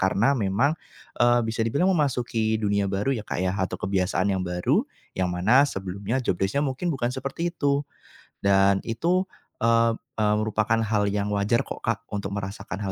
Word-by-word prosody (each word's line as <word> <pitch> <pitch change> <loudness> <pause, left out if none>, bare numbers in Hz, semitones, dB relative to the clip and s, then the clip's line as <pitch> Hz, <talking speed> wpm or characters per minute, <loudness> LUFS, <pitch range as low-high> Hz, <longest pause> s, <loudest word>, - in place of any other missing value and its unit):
karena 100 +7 +3
memang, 115 +3 +1 0.5
eee, 120 0 +4
bisa 110 +1 -3
dibilang 140 +12 +2
memasuki 120 -8 0
dunia 100 -2 0
baru 100 +7 0
ya, 120 - -2
Kak, 105 - -5
ya 90 +1 0
atau 95 -2 -2
kebiasaan 95 +1 0
yang 95 - -1
baru, 90 0 +1 0.3
yang 95 -1 -1
mana 110 +11 +4
sebelumnya 100 +6 -3
job 90 - -1
desc-nya 100 +10 +1
mungkin 140 +6 -2
bukan 125 -6 -1
seperti 140 +6 -3
itu 145 -2 0 0.6
dan 100 0 +4
itu, 170 +11 +1 0.4
eee 115 0 +4 0.2
eee, 105 -1 +3
merupakan 110 +1 +1
hal 105 -2 +1
yang 105 0 -1
wajar 100 +3 +1
kok, - - -7
Kak, 115 0 -2
untuk 100 -1 -3
merasakan 95 -1 -5
hal 95 - -2
110 Hz, 170 wpm, -25 LUFS, 100-125 Hz, 0.6 s, eee